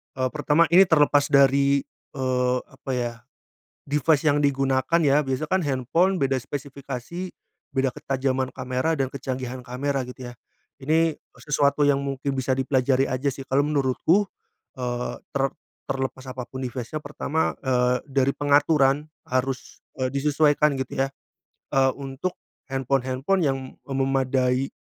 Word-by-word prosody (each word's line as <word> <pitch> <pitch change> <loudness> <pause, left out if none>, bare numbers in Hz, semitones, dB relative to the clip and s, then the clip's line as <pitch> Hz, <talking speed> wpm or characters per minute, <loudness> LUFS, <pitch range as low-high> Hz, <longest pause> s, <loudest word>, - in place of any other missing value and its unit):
E 130 0 +1
pertama 150 +4 +2
ini 175 +4 +7
terlepas 145 -4 +3
dari, 140 0 +5 0.3
eee, 125 -2 0
apa 135 0 -8
ya, 120 -2 -1 0.7
device 150 +1 +2
yang 145 -1 +3
digunakan 135 +2 +2
ya, 145 0 +4
biasa 135 +1 -2
kan 190 +4 +1
handphone 160 +7 +1
beda 135 -2 +1
spesifikasi 140 +5 -6 0.4
beda 135 0 +1
ketajaman 130 -1 -1
kamera 130 +5 -1
dan 135 -1 +1
kecanggihan 130 -1 -5
kamera, 135 +2 -2
gitu 125 0 -8
ya. 120 - -8 0.5
Ini 160 +3 +2 0.3
sesuatu 145 0 +2
yang 140 -1 +3
mungkin 140 0 -2
bisa 130 0 -1
dipelajari 130 0 +2
aja 130 +2 0
sih 135 +1 -8
kalau 135 +2 +3
menurutku, 150 +7 +2 0.5
eee, 125 -1 -3
ter 135 -1 +1 0.5
terlepas 130 -1 -3
apapun 130 0 -6
device-nya, 125 +4 -4
pertama, 150 +2 -1
eee, 125 -1 +2
dari 135 0 +2
pengaturan 145 0 +3 0.2
harus, 130 0 -2 0.2
eee, 130 - +2
disesuaikan 145 +1 +2
gitu 130 0 -1
ya, - - -3 0.7
eee, 135 -1 +4
untuk 135 +6 -4 0.4
handphone-handphone 135 +6 0
yang 135 -2 +1 0.3
memadai 135 -1 +1
135 Hz, 130 wpm, -24 LUFS, 130-145 Hz, 0.7 s, ini